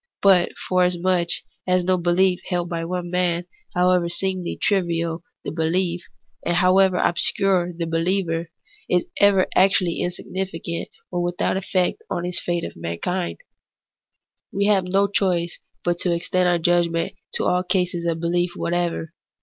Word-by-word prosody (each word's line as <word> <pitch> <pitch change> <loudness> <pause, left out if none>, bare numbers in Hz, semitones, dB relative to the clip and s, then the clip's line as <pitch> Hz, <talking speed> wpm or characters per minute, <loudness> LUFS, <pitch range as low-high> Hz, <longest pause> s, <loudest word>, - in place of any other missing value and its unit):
But 190 -3 +5
forasmuch 180 -1 +2 0.4
as 180 0 +3
no 185 +1 +2
belief 180 +1 +2
held 175 -2 -1
by 165 -2 -3
one 175 0 -4
man, 175 -1 0 0.3
however 180 -1 +3
seemingly 185 0 -2
trivial 170 -4 0 0.2
the - - -3
belief, 170 +2 0 0.4
and 175 - 0
however 185 +1 +4
obscure 180 0 +2
the 170 -1 -4
behever, 165 0 0 0.4
is 180 -1 +2
ever 200 -2 +5
actually 185 -2 +3
insignificant 175 -1 -4 0.2
or 175 -1 -1
without 175 +1 0
its 190 0 -4
effect 185 - 0
on 175 - -2
the 180 - -2
fate 175 -1 0
of - - -8
mankind, 85 - -3 1.1
we 200 +1 0
have 200 -3 +3
no 195 +2 +2
choice 180 -4 0 0.2
but 175 0 0
to 180 - 0
extend 180 +1 +1
our 175 - +3
judgment 170 +1 +1 0.2
to - - -1
all 180 - +2
cases 180 -1 0
of 165 -1 0
behef 175 +1 0
whatever. 170 -1 -2
175 Hz, 145 wpm, -22 LUFS, 170-185 Hz, 1.1 s, But